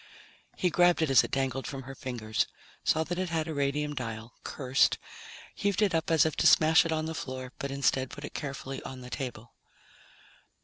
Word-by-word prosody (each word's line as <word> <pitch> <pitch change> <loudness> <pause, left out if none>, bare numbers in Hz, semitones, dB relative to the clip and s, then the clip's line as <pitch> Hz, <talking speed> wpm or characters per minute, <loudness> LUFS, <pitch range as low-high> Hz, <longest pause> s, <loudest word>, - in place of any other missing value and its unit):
He 180 - +1
grabbed 175 0 +4
it 150 - +1
as 130 -2 +7
it - - -4
dangled 135 -1 -1
from 135 -1 -6
her 135 +2 -8
fingers, 120 -5 -2 0.4
saw 160 - +2
that 175 +3 -4
it 185 -1 -1
had 160 -1 -1
a 160 - -3
radium 145 +1 0
dial, 115 -3 -5
cursed, 135 -1 +2 0.6
heaved 200 -1 0
it 195 -4 +2
up 160 -1 0
as 160 -2 +5
if 160 - 0
to - - +4
smash 160 +1 +6
it - - -3
on 155 0 0
the 160 - -3
floor, 130 -4 -5
but 140 - -3
instead 135 -1 +1
put 145 - -8
it - - -9
carefully 135 -1 -5
on 130 -1 -8
the 125 0 -10
table. 120 -4 -5
140 Hz, 205 wpm, -29 LUFS, 130-160 Hz, 0.6 s, as